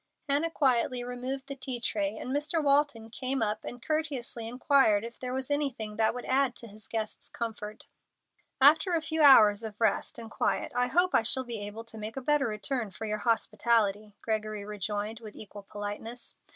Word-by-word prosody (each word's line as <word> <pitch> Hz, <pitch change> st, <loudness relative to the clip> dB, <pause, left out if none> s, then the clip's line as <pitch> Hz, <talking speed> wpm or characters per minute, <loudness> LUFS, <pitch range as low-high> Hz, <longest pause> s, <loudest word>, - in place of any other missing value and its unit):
Hannah 290 Hz, +4 st, +2 dB
quietly 255 Hz, -5 st, +1 dB
removed 250 Hz, +2 st, -5 dB
the 275 Hz, -, -6 dB
tea 255 Hz, -2 st, -3 dB
tray, 210 Hz, -2 st, -1 dB
and 260 Hz, +5 st, -3 dB
Mr. 300 Hz, +2 st, 0 dB
Walton 280 Hz, -6 st, +2 dB
came 260 Hz, 0 st, -1 dB
up 210 Hz, 0 st, -1 dB
and 245 Hz, -1 st, -8 dB
courteously 285 Hz, -7 st, -2 dB
inquired 250 Hz, -3 st, +3 dB
if 235 Hz, 0 st, -10 dB
there 250 Hz, -1 st, -4 dB
was 265 Hz, +2 st, -3 dB
anything 255 Hz, -8 st, -1 dB
that 220 Hz, +1 st, +2 dB
would 245 Hz, -, -6 dB
add 260 Hz, -1 st, +2 dB
to 235 Hz, -, -11 dB
his 215 Hz, 0 st, -11 dB
guest's 220 Hz, -2 st, -4 dB
comfort. 215 Hz, -2 st, -6 dB, 0.7 s
"After 315 Hz, +6 st, +6 dB
a 325 Hz, -, +1 dB
few 320 Hz, 0 st, -1 dB
hours 220 Hz, -8 st, +8 dB
of 215 Hz, -2 st, -7 dB
rest 220 Hz, -3 st, +1 dB
and 225 Hz, -1 st, -7 dB
quiet -, -, -1 dB
I 245 Hz, 0 st, +2 dB
hope 355 Hz, +6 st, +2 dB
I -, -, +5 dB
shall 250 Hz, +3 st, +2 dB
be 235 Hz, -3 st, -4 dB
able 220 Hz, +2 st, -7 dB
to 230 Hz, -1 st, -9 dB
make 215 Hz, +4 st, -6 dB
a -, -, -2 dB
better 290 Hz, 0 st, +2 dB
return 220 Hz, +2 st, -2 dB
for 220 Hz, -, -7 dB
your 215 Hz, 0 st, -2 dB
hospitality," 215 Hz, -2 st, +1 dB
Gregory 215 Hz, -2 st, -2 dB
rejoined, 210 Hz, +2 st, -3 dB
with 215 Hz, -3 st, -11 dB
equal 205 Hz, -1 st, -9 dB
politeness. 210 Hz, +4 st, -6 dB
235 Hz, 190 wpm, -29 LUFS, 215-270 Hz, 0.7 s, hours